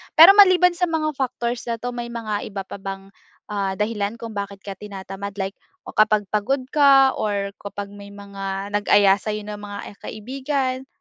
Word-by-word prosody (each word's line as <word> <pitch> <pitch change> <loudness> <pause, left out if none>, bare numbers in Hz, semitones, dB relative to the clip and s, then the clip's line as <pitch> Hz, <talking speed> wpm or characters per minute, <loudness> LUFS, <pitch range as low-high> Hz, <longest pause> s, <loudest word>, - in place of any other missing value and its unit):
Pero 335 +4 +11
maliban 365 -3 +7
sa 355 0 +1
mga 315 -2 0
factors 240 -2 -3
na 235 - 0
'to, 245 +1 -4
may 240 -1 -5
mga 220 -3 -4
iba 195 -1 -5
pa 195 - -9
bang, 195 0 -7 0.4
ah, 195 -2 -1
dahilan 210 0 -2
kung 230 -1 -8
bakit 200 -1 -6
ka 195 -1 -6
tinatamad? 200 0 -7
Like, 195 0 -3 0.3
o - - -9
kapag 215 -1 +4
pagod 255 +6 0
ka, 275 -2 +6
or 200 -2 -1
kapag 200 0 -7
may 200 0 -11
mga 200 -1 -6
nag-aya 205 -1 +4
sa'yo 210 0 -4
na 210 0 -7
mga 205 -1 -7 0.2
kaibigan, 260 +3 -3
210 Hz, 175 wpm, -22 LUFS, 200-255 Hz, 0.4 s, Pero